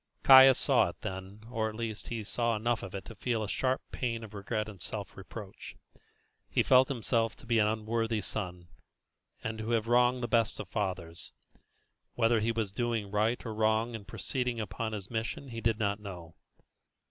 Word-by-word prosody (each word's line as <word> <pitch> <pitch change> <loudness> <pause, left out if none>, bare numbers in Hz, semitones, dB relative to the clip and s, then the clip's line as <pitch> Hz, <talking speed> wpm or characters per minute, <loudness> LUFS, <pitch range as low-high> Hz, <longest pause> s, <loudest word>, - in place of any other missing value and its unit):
Caius 130 -1 +10
saw - - +3
it - - -11
then, 95 +3 -6
or, 110 -2 0
at 110 - -9
least, 110 -2 -4
he 115 -2 -4
saw 115 +2 0
enough 115 +2 0
of 95 - -7
it 95 -2 -6
to - - -9
feel 115 -3 -1
a - - -3
sharp 130 +5 0
pang 115 -3 -2
of 110 -1 -10
regret 105 +1 -2
and 100 -5 -10
self - - -6
reproach. - - -9 0.7
He - - +2
felt 130 0 +6
himself 115 -3 0
to - - -16
be 115 -1 +2
an 105 - +4
unworthy 110 0 -1
son, 90 -4 -5 0.7
and 110 0 -3
to 110 +1 -4
have 115 -1 +1
wronged 125 +1 +3
the - - 0
best 115 0 +1
of - - -5
fathers. 90 -5 -4 0.8
Whether 115 -1 +3
he 110 +2 +1
was 110 -4 -2
doing 115 -2 -2
right 110 +4 +1
or 110 - -4
wrong 110 +2 +1
in 110 -3 -7
proceeding 125 0 -2
upon 110 +2 -3
his 100 -1 -6
mission 115 +4 -3
he 115 -1 -6
did 115 -1 +1
not 100 -2 0
know. 90 -5 -9
110 Hz, 190 wpm, -31 LUFS, 105-120 Hz, 0.8 s, Caius